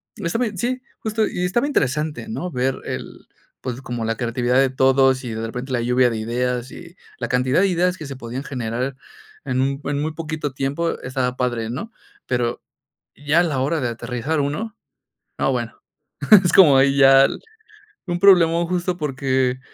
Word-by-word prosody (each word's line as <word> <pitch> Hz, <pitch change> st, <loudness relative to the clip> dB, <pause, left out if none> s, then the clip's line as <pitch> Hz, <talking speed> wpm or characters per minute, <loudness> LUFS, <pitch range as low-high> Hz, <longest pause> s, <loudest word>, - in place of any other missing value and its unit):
está 165 Hz, +5 st, -2 dB
bien, 225 Hz, -5 st, -2 dB
sí, 250 Hz, +6 st, -2 dB, 0.2 s
justo, 220 Hz, 0 st, 0 dB
y 180 Hz, -, -3 dB
estaba 235 Hz, +10 st, +1 dB
interesante, 150 Hz, -, -1 dB
¿no? 180 Hz, -5 st, -4 dB
Ver 130 Hz, 0 st, 0 dB
el, -, -, -7 dB, 0.3 s
pues, 125 Hz, 0 st, -5 dB
como 120 Hz, -3 st, -4 dB
la 115 Hz, 0 st, -1 dB
creatividad 120 Hz, +1 st, 0 dB
de 135 Hz, -1 st, +3 dB
todos, 130 Hz, 0 st, +3 dB
y 115 Hz, -, -4 dB
de 110 Hz, -, -4 dB
repente 125 Hz, +4 st, -6 dB
la 120 Hz, -, +1 dB
lluvia 125 Hz, +1 st, +3 dB
de 115 Hz, -, -3 dB
ideas, 125 Hz, +2 st, -2 dB
y 170 Hz, 0 st, -12 dB, 0.2 s
la 120 Hz, -, -2 dB
cantidad 125 Hz, +4 st, +1 dB
de 200 Hz, -, +4 dB
ideas 180 Hz, 0 st, +1 dB
que 155 Hz, -, -8 dB
se 140 Hz, -1 st, -7 dB
podían 125 Hz, +1 st, -6 dB
generar 125 Hz, +1 st, -3 dB, 0.5 s
en 130 Hz, -2 st, -2 dB
un 135 Hz, +2 st, 0 dB
en 145 Hz, 0 st, -1 dB
muy 155 Hz, +1 st, -2 dB
poquito 155 Hz, -3 st, -4 dB
tiempo 140 Hz, +5 st, -2 dB
estaba 125 Hz, 0 st, -2 dB
padre, 120 Hz, -3 st, -2 dB
¿no? 170 Hz, -, -5 dB, 0.4 s
Pero 120 Hz, -1 st, -1 dB, 0.5 s
ya 145 Hz, +4 st, +2 dB
a -, -, +4 dB
la 150 Hz, -6 st, -1 dB
hora 150 Hz, +4 st, 0 dB
de 125 Hz, -, -1 dB
aterrizar 125 Hz, +6 st, -3 dB
uno, 205 Hz, +11 st, -3 dB, 0.6 s
no, -, -, +1 dB
bueno, -, -, -4 dB, 0.7 s
es 165 Hz, -, +2 dB
como 155 Hz, -9 st, +7 dB
ahí 135 Hz, +1 st, +4 dB
ya 135 Hz, 0 st, +7 dB, 0.8 s
un 175 Hz, -1 st, -2 dB
problemón 170 Hz, -3 st, +5 dB
justo 180 Hz, 0 st, -1 dB
porque, 130 Hz, -4 st, 0 dB
135 Hz, 180 wpm, -21 LUFS, 125-165 Hz, 0.8 s, como